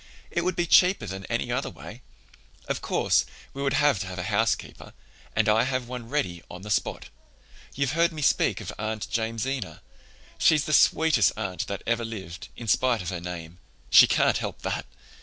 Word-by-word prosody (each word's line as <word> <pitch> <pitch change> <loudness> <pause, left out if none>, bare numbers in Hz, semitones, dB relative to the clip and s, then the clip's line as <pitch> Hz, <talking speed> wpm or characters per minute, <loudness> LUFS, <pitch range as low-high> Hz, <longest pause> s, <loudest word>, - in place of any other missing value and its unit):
It 170 - -1
would 185 +1 0
be 175 - 0
cheaper 180 +3 +4
than 95 +1 -6
any - - -2
other - - -1
way. - - -11 0.7
Of - - -2
course, - - +2 0.3
we 140 - -6
would 135 -2 0
have 145 -8 +3
to 95 - -4
have 95 0 -7
a 90 - -3
housekeeper 110 +2 -1 0.4
and 110 -1 +2
I 105 +1 +4
have 130 -2 -2
one 125 -2 -7
ready 105 - -2
on 90 +1 -9
the 105 - -6
spot. - - -1 0.7
You've 140 -1 0
heard 170 +3 +2
me 155 -2 -5
speak - - +2
of - - -6
Aunt 110 0 -3
Jamesina? 115 +1 -3 0.6
She's 155 -3 +4
the 155 - -2
sweetest 155 - +4
aunt 95 -4 -3
that 100 - -5
ever 115 0 0
lived, 95 -6 -7
in 115 - -8
spite 120 +1 +2
of 85 - -4
her 90 -2 -4
name. 85 -1 -7 0.3
She - - +9
can't - - +3
help - - -6
that! - - -3
115 Hz, 190 wpm, -26 LUFS, 95-140 Hz, 0.7 s, She